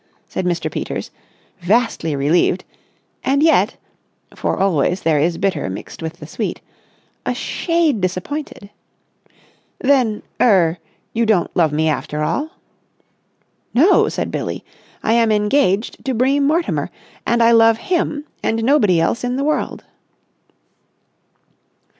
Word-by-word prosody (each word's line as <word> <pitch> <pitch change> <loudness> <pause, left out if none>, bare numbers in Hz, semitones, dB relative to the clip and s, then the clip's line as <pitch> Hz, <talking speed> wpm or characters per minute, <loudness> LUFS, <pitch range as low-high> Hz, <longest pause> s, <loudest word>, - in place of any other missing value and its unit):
said 185 - -4
Mr. 175 -1 -1
Peters, - - -4 0.5
vastly 180 -5 +1
relieved; 165 +6 +2 0.6
and 280 +2 +2
yet—for 320 - -1
always 180 -1 +1
there 160 -2 +2
is 165 +3 +1
bitter 195 - -1
mixed 95 - -8
with 160 0 -4
the - - -11
sweet—a - - -7
shade 335 - 0
disappointed. 200 +4 -4 1.1
"Then—er—you 215 - +1
don't 200 -6 +1
love 160 -4 +3
me 155 +2 +1
after 150 0 -2
all?" 295 - -1 1.3
"No!" 320 +11 +5
said - - -3
Billie. - - -4 0.4
"I 225 - +2
am 230 -1 +3
engaged 210 0 +1
to 260 -2 -1
Bream 275 +4 +2
Mortimer, 330 +3 0 0.3
and 235 0 +2
I 230 - +5
love 225 -1 +5
him 300 -2 -1 0.2
and 225 0 -1
nobody 225 - +4
else 165 +10 0
in 245 0 -1
the 275 - -1
world!" 305 +1 -1
220 Hz, 115 wpm, -19 LUFS, 175-275 Hz, 1.3 s, No